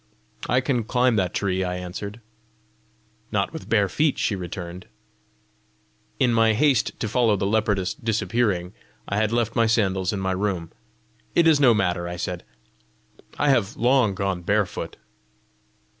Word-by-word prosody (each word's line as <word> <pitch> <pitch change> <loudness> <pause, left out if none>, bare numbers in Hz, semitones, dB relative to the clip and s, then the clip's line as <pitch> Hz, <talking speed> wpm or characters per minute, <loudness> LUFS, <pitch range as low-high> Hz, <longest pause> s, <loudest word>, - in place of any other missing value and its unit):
"I 125 +2 +3
can 130 -3 0
climb 125 +1 +2
that 90 -3 +1
tree," 95 -2 -1
I 90 0 -2
answered. 100 +5 -6 1.1
"Not 100 -2 0
with 160 - -8
bare 105 -3 +3
feet!" 150 +7 +1
she 105 - 0
returned. 90 0 -7 1.3
In 125 -2 +3
my 115 -1 +4
haste 130 -1 +2
to - - 0
follow 115 -1 +2
the 100 0 -2
leopardess 100 -3 +1
disappearing, 110 -5 -1 0.3
I 100 - -2
had 110 0 +1
left 115 -1 0
my 115 -1 +3
sandals 95 -5 +1
in 100 - -3
my 95 0 -1
room. 95 -3 -2 0.6
"It 170 - +5
is 160 -3 +5
no 125 -5 +5
matter," 90 -3 0
I 85 - -5
said; 90 0 -4 0.9
"I 145 - +2
have 115 -5 +1
long 120 -4 +3
gone 95 -2 -2
barefoot!" 100 +2 -1
105 Hz, 150 wpm, -24 LUFS, 95-120 Hz, 1.3 s, It